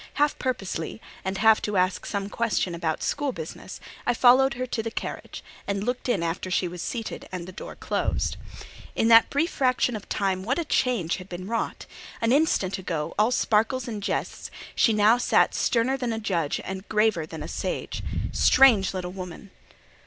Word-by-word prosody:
Half 290 +1 +1
purposely, 195 -9 -3 0.2
and 190 +1 -2
half 220 +1 +5
to 210 -2 -1
ask 185 +1 +1
some 200 -1 -2
question 210 -4 -1
about 165 -2 -2
school 290 -2 -1
business, 160 -9 -8 0.3
I 245 - +3
followed 255 +2 +5
her 255 +1 -2
to 240 -2 -2
the 225 - -3
carriage, - - -6 0.2
and 200 0 -1
looked 245 +2 -2
in 195 -8 +1
after 170 +2 -2
she 180 0 +1
was 175 0 -7
seated 230 -3 -5
and 180 -2 -5
the - - -7
door 185 - -8
closed. - - -1 0.6
In 225 - +2
that 230 0 +7
brief 320 +5 0
fraction 255 -2 +1
of 210 - -8
time 195 -2 0
what 255 +7 0
a 340 - -1
change 240 - +1
had 185 0 -10
been 180 +1 -6
wrought! 230 +1 -3 0.3
An 230 0 +1
instant 230 - +2
ago, 165 -5 -3
all 215 +2 +5
sparkles 235 +1 +1
and 215 -3 -4
jests, - - -3 0.2
she 230 - +4
now 215 +3 +4
sat - - +3
sterner 255 +3 +1
than 245 -3 -2
a 220 - -3
judge 170 -9 -1
and 190 +1 -6
graver 210 -7 +2
than 160 -2 -7
a - - -6
sage. - - -4 0.3
Strange 220 -9 +5
little 180 -1 -4
woman! 185 +1 -8
210 Hz, 185 wpm, -26 LUFS, 185-245 Hz, 0.6 s, that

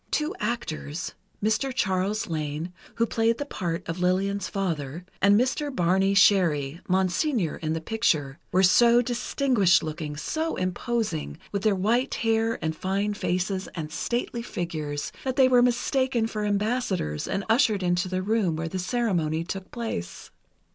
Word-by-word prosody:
Two 305 +1 0
actors—Mr. 215 - -3
Charles 205 -3 0
Lane, 155 +2 -3 0.2
who 230 - +2
played 230 0 +1
the 285 - -3
part 170 -11 -4
of 165 +2 -4
Lillian's 195 +3 0
father, 170 -4 -3 0.2
and 200 +2 +6
Mr. 265 +4 0
Barney 190 -4 +2
Sherry—Monseigneur 185 - +2
in 155 -1 -2
the 160 - -3
picture—were 165 -3 0
so 235 +6 +6
distinguished 240 -5 +2
looking, 155 -1 -5
so 320 - -2
imposing, 185 - -2
with 200 - -2
their 210 0 +3
white 230 +8 +1
hair 225 0 +1
and 160 0 -1
fine 195 +5 -1
faces 185 0 -1
and 155 -3 -5
stately 235 +6 -2
figures, 155 -9 -4
that 260 -1 -2
they 265 -2 +6
were 250 -1 +5
mistaken 250 0 +1
for 215 -2 -3
ambassadors 205 - -1
and 195 - -2
ushered 225 -4 +3
into 175 +1 +1
the 185 0 -1
room 205 -5 +1
where 165 +1 -3
the 185 +3 -4
ceremony 180 -7 0
took 190 +2 -6
place. 225 - -5
195 Hz, 140 wpm, -26 LUFS, 170-230 Hz, 0.2 s, and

